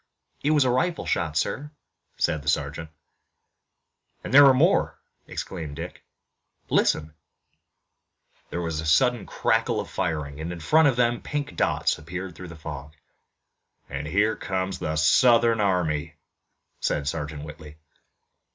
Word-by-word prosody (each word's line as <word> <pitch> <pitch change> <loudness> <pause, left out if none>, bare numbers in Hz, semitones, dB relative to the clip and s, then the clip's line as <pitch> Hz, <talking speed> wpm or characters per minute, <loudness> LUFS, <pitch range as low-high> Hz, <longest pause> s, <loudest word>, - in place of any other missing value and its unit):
"It 145 - +2
was 150 -2 +4
a 125 - +3
rifle 165 +8 0
shot, 80 -2 -1
sir," 145 - -1 0.5
said 80 - 0
the 75 - -2
sergeant. 75 +2 -2 1.3
"And - - -6
there 145 0 +10
are - - +8
more," 130 - +2 0.3
exclaimed 80 -6 -6
Dick. - - -8 0.7
"Listen!" 75 0 +2 1.4
There 85 - -3
was 80 -2 -2
a - - -7
sudden 120 +8 +3
crackle - - +1
of - - -6
firing, 75 -2 -3
and 85 +2 -4
in 90 - -6
front 160 - +4
of 135 - +2
them 120 0 +1
pink 145 0 -4
dots - - +1
appeared 90 +3 -6
through 90 +2 -9
the 85 - -10
fog. 75 -2 -8 1.0
"Here 90 +11 0
comes 95 0 -3
the 80 0 -2
Southern 115 +7 +4
army!" 85 -5 0 0.6
said 70 -1 -1
Sergeant 75 0 -4
Whitley. 75 0 -11
85 Hz, 135 wpm, -25 LUFS, 75-120 Hz, 1.4 s, there